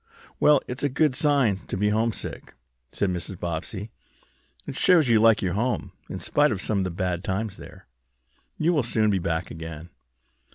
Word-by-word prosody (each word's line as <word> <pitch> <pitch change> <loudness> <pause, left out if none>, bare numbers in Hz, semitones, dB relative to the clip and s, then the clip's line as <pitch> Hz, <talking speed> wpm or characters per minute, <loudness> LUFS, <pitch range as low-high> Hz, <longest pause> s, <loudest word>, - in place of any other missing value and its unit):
"Well, 150 -2 +5
it's 125 +2 -5
a 145 - +1
good 145 +1 +2
sign 140 - +2
to - - -3
be 105 +2 +2
homesick," 110 +1 -2 0.4
said 100 -2 0
Mrs. 90 +1 -5
Bobbsey. 90 +5 -4 0.7
"It - - -6
shows 160 -4 +4
you 115 -2 +5
like 115 -1 +5
your 90 -2 0
home, 120 +2 -1 0.2
in - - -4
spite 150 0 +2
of 100 - -2
some 100 +1 0
bad 90 -1 -2
times 100 +1 -3
there. - - -13 0.7
You 165 +3 +2
will 150 - +3
soon 110 -3 +1
be 95 - +1
back 85 0 -2
again." 80 +1 -8
105 Hz, 170 wpm, -25 LUFS, 90-125 Hz, 0.7 s, Well